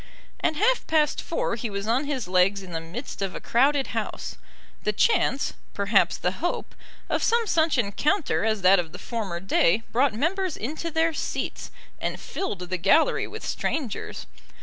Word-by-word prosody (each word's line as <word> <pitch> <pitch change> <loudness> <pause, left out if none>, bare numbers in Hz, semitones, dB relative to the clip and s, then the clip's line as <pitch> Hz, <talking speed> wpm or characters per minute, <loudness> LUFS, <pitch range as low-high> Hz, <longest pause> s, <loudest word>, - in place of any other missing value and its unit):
At 315 - +2
half 480 +8 +2
past 305 -2 +2
four 330 - -1
he 230 0 -4
was 200 0 -4
on 240 +6 +1
his 270 -8 -2
legs 185 +2 +3
in 185 - -10
the 165 -1 -3
midst 190 +12 -7
of 195 -2 -2
a - - -4
crowded 275 +3 +3
House. - - -4 0.5
The - - +1
chance, 285 - +2 0.2
perhaps 200 -3 +3
the 180 - 0
hope, 350 - -2 0.3
of - - 0
some 470 0 +3
such 320 -6 +2
encounter 285 - +1
as 220 -3 0
that 190 +1 +7
of 165 -2 -4
the - - -7
former 205 -8 -4
day, 190 +2 +2
brought 255 0 +2
members 360 - 0
into 310 +8 -4
their 325 0 +1
seats, - - -3 0.3
and - - -3
filled 385 - -4
the 180 +1 -3
gallery 200 - +3
with - - -8
strangers. 265 -10 -3
240 Hz, 170 wpm, -26 LUFS, 195-315 Hz, 0.5 s, that